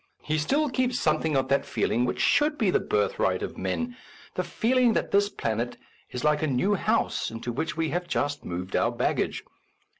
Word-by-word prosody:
He 155 0 0
still 285 - +1
keeps 250 -2 0
some 155 -1 +2
thing 160 -2 0
of 135 -1 +2
that 140 - +3
feeling 120 +2 0
which 125 0 -2
should 300 0 +3
be 215 -8 +2
the - - +3
birthright 465 +3 0
of - - -5
men 245 0 -2 0.2
— - - -21
the - - -1
feeling 245 0 +2
that - - -1
this 200 0 +3
planet 115 - -2 0.3
is 125 -1 -5
like 150 -1 +3
a 155 - +1
new 145 +10 +2
house 195 - 0
into 115 +2 -5
which 160 +7 -3
we 165 -1 0
have 175 +2 -2
just 145 -3 -1
moved 90 +2 -4
our - - +2
baggage. - - -1
160 Hz, 205 wpm, -27 LUFS, -, 0.3 s, that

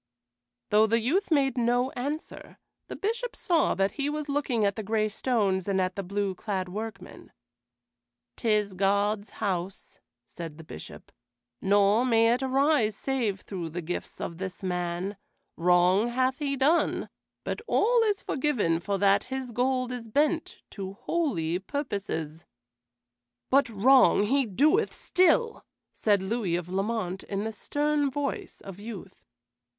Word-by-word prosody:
Though 215 +1 +5
the 230 +2 +2
youth 335 - 0
made 270 -5 +2
no 245 +2 +2
answer, 290 +5 -6 0.3
the - - -6
Bishop 470 +4 -3
saw 345 -5 +1
that 195 +1 +1
he 285 0 -2
was 300 0 -3
looking 275 -6 0
at 200 0 +1
the 220 - -4
gray 215 +1 0
stones 205 -5 0
and 195 -1 +1
at 185 0 0
the 200 - -2
blue 200 +1 -2
clad 185 -1 -3
workmen. 220 +4 -7 1.0
"'Tis 210 -3 +1
God's 200 +2 +1
house," 190 -2 -3 0.3
said 165 -3 -8
the 160 - -10
Bishop, 80 - -11 0.5
"nor 205 +3 +4
may 230 -2 +4
it 250 - -1
arise 265 -4 +2
save 225 -7 -1
through 175 -5 -5
the 170 +2 -5
gifts 175 +3 -5
of 170 0 -5
this 190 0 -6
man. 180 +2 -2 0.4
Wrong 180 +5 +4
hath 255 +2 0
he 280 -2 -1
done, 300 +6 +2 0.4
but - - -3
all 470 +2 +3
is 420 -3 +1
forgiven 245 - 0
for 200 +3 -2
that 200 +1 +3
his 260 -1 -5
gold 255 +1 0
is 245 -2 -6
bent 300 +7 0
to 195 -1 -6
holy 185 - -1
purposes." 195 - -4 1.1
"But 275 -1 +4
wrong 235 +1 +5
he 265 +4 +2
doeth 305 - +2
still," 370 +6 +2 0.3
said 205 -3 +2
Louis 195 -4 -1
of 175 0 -4
Lamont, 195 -1 -2
in 200 0 -3
the 220 - -3
stern 290 +5 0
voice 280 +1 -4
of 195 -1 -10
youth. 210 -3 -9
220 Hz, 145 wpm, -27 LUFS, 195-270 Hz, 1.1 s, Though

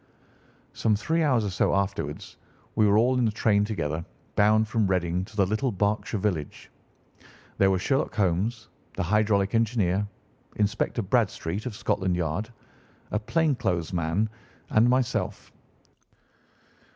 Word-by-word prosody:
Some 110 -2 +1
three 160 +11 0
hours 130 -8 +2
or 100 - -2
so 95 - +1
afterwards 95 -7 -3 0.4
we 110 -1 +4
were 100 +1 +4
all 125 +3 +3
in 120 - +3
the 110 - +2
train 105 -1 +2
together, 80 -7 -3 0.3
bound 110 +1 +4
from 110 -2 +1
Reading 90 -1 0
to 105 - -16
the 100 -2 +3
little 110 +7 0
Berkshire 105 +2 -1
village. 90 -8 -3 0.9
There 95 - +5
were 95 - +2
Sherlock 135 +9 0
Holmes, 105 +4 0 0.3
the - - -1
hydraulic 100 0 +2
engineer, 105 -4 +1 0.5
Inspector 105 +3 0
Bradstreet, 100 -2 -1
of 115 - -5
Scotland 95 -3 0
Yard, 90 +6 -2 0.6
a 105 - 0
plain 155 +7 +1
clothes 95 -11 -2
man, 85 +5 0 0.4
and 115 +3 +4
myself. 130 -1 -1
105 Hz, 140 wpm, -26 LUFS, 95-115 Hz, 0.9 s, There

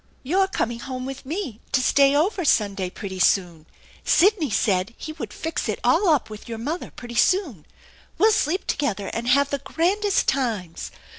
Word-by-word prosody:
" - - -36
You're 385 0 +4
coming 235 -10 -2
home 255 0 -5
with 270 0 -7
me 305 - -4
to - - +4
stay 280 +1 +4
over 365 +5 +1
Sunday 200 - +1
pretty 190 0 -7
soon. 175 -4 +1 0.4
Sidney 370 -4 +3
said 195 +1 0
he 310 - -6
would 250 -10 -7
fix 325 +8 -4
it - - -1
all 400 - +3
up 300 -5 +2
with 215 +1 -10
your 225 - -4
mother 300 +10 -4
pretty 240 -1 -10
soon. 260 - +1 0.5
We'll 440 - +5
sleep 365 -2 0
together 205 -9 -2
and 235 +1 -3
have 280 +3 +3
the 280 - -1
grandest 370 +9 0
times. 220 -11 -2
265 Hz, 175 wpm, -23 LUFS, 215-325 Hz, 0.5 s, We'll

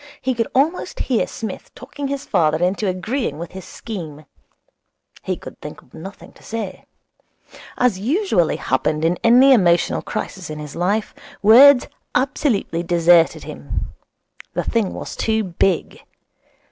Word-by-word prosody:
He 260 - -1
could 230 -2 -1
almost 305 +7 0
hear 250 -4 0
Psmith 220 -5 -7
talking 280 +2 -6
his 280 0 -4
father 160 -5 +2
into 185 +5 0
agreeing 190 - -2
with 170 +1 -7
his 190 -1 -9
scheme. 160 -9 -8 1.0
He - - -3
could - - -12
think - - -9
of - - -28
nothing 195 +5 -10
to - - -21
say. 220 -5 -6 0.9
As 245 -7 +2
usually 235 - +1
happened 150 +4 -1
in 175 +2 +1
any 250 +4 +7
emotional 175 -7 +3
crisis 185 -4 -5
in 155 - -6
his 150 -1 -8
life, 200 +5 -1 0.3
words 250 +5 +8 0.3
absolutely 250 - 0
deserted 170 -1 +3
him. - - -6 0.6
The - - 0
thing 225 -5 0
was - - -7
too 220 -1 0
big. 180 -1 -1
200 Hz, 140 wpm, -20 LUFS, 170-250 Hz, 1.0 s, words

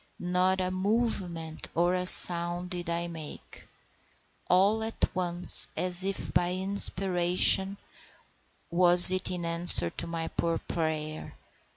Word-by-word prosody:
Not 180 +1 -3
a 185 0 -5
movement 185 -5 -6
or 175 +2 -2
a 180 0 -5
sound 175 0 +4
did 175 -1 -7
I 170 0 -6
make. 160 -3 -14 0.8
All 200 +5 -1
at 225 0 -5
once, 175 -1 +3
as 180 0 -3
if 195 0 -6
by 175 0 -3
inspiration—was 185 -1 +1
it 185 0 -3
in 180 -2 -8
answer 170 - +3
to 170 - -8
my 165 -1 -8
poor 165 -1 -5
prayer? 155 -2 -8
180 Hz, 115 wpm, -24 LUFS, 170-185 Hz, 0.8 s, sound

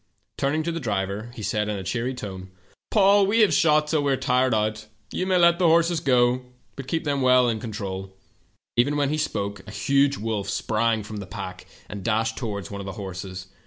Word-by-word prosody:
"Turning 145 +3 0
to 170 - -1
the 165 - -3
driver, 100 -2 -2
he 110 - -7
said, 105 +1 -1
in 105 - -2
a 95 - -5
cheery 115 +8 -2
tone: 95 -5 -7
" - - -32
' - - -67
Paul, 200 -1 +5
we 225 +3 +3
have 210 - +5
shot 150 -2 +4
till 155 -1 +1
we 140 -1 +1
are 135 - +2
tired 130 -1 +2
out. 110 0 -1 0.2
You 185 - -2
may 185 -1 +3
let 170 0 +5
the 180 - +4
horses 165 +1 +3
go, 125 -4 +3 0.3
but 135 -1 -8
keep 160 +4 -1
them 140 -2 -1
well 125 -1 +5
in 115 -2 0
con 115 0 -6
trol.' 95 -3 -5 0.7
"Even 140 +5 +2
while 140 -1 +1
he 155 - 0
spoke 100 -8 -2
a - - -8
huge 140 +6 +2
wolf 105 -3 -3
sprang 110 +1 0
from 105 +1 -7
the 100 -1 -6
pack 95 -3 -7 0.2
and 100 -2 -7
dashed 115 0 0
toward 100 -7 -4
one 100 0 -5
of - - -8
the 95 - -5
horses. 95 -1 -6
115 Hz, 230 wpm, -24 LUFS, 100-145 Hz, 0.7 s, Paul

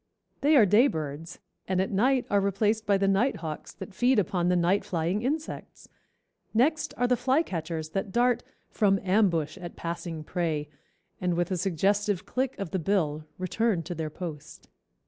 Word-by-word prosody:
They 300 +2 +4
are 235 -7 +7
day 215 +7 +5
birds 160 - -5 0.3
and 185 -1 0
at 190 - 0
night 250 +6 +2
are 200 -1 +4
replaced 210 +3 0
by 200 -1 +4
the 195 0 +1
nighthawks 195 - -1
that 190 0 -9
feed 250 +6 +3
upon 185 -3 +1
the 180 - +3
night 180 +3 +2
flying 175 +3 -1
insects. 300 +6 -4 0.7
Next 300 +7 +2
are 245 - +2
the 250 0 +3
flycatchers 175 - -1
that 195 +3 -3
dart 240 +1 +2 0.3
"from 200 -3 +2
ambush 185 -5 +1
at 175 -2 -8
passing 170 -1 -5
prey, 155 -3 -2 0.5
and 180 -1 0
with 175 +2 -1
a - - +1
suggestive 195 +2 0
click 260 +1 -2
of 195 -4 -5
the 190 - 0
bill, 155 -4 0
return 185 0 0
to 175 +3 -5
their 160 -2 -3
post." 155 -2 -8
190 Hz, 165 wpm, -27 LUFS, 170-220 Hz, 0.7 s, are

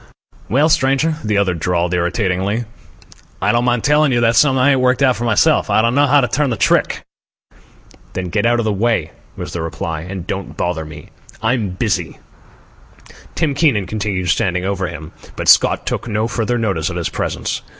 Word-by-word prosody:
"Well, 140 +8 +3
stranger," 150 +1 +1
the 105 -1 0
other 100 -3 +2
drawled 85 +1 -1
irritatingly, 95 +5 -1 0.7
"I - - +2
don't 120 +1 +1
mind 120 -2 +1
telling 150 0 +3
you 120 - +2
that's 115 0 +4
something 135 -3 +3
I 130 +2 +4
ain't 135 - +2
worked 130 +1 +2
out 130 -2 +4
for 120 - -4
myself. 110 -3 +2
I 110 - +3
don't 115 +1 +2
know 145 +2 +3
how 145 +1 +4
to 125 - +1
turn 140 +4 0
the 115 - -2
trick." - - +1 1.1
"Then 90 -1 -4
get 100 - +1
out 120 0 +2
of 115 - -1
the 110 - 0
way," 100 -6 0 0.3
was - - -6
the 85 - -3
reply, 80 -1 -4
"and 90 +1 -7
don't 95 0 -5
bother 85 -3 -2
me. 80 0 -11 0.3
I'm 115 -3 0
busy." - - -2 1.2
Tim 155 -4 0
Keenan 135 - +2
continued 100 -2 -3
standing 90 +1 0
over 95 -1 -2
him, 80 0 -8 0.2
but - - -5
Scott - - +4
took - - -3
no 110 0 -1
further 120 0 -1
notice 95 -8 -1
of 90 - -6
his 85 -3 -2
presence. - - -3
110 Hz, 190 wpm, -17 LUFS, 90-125 Hz, 1.2 s, that's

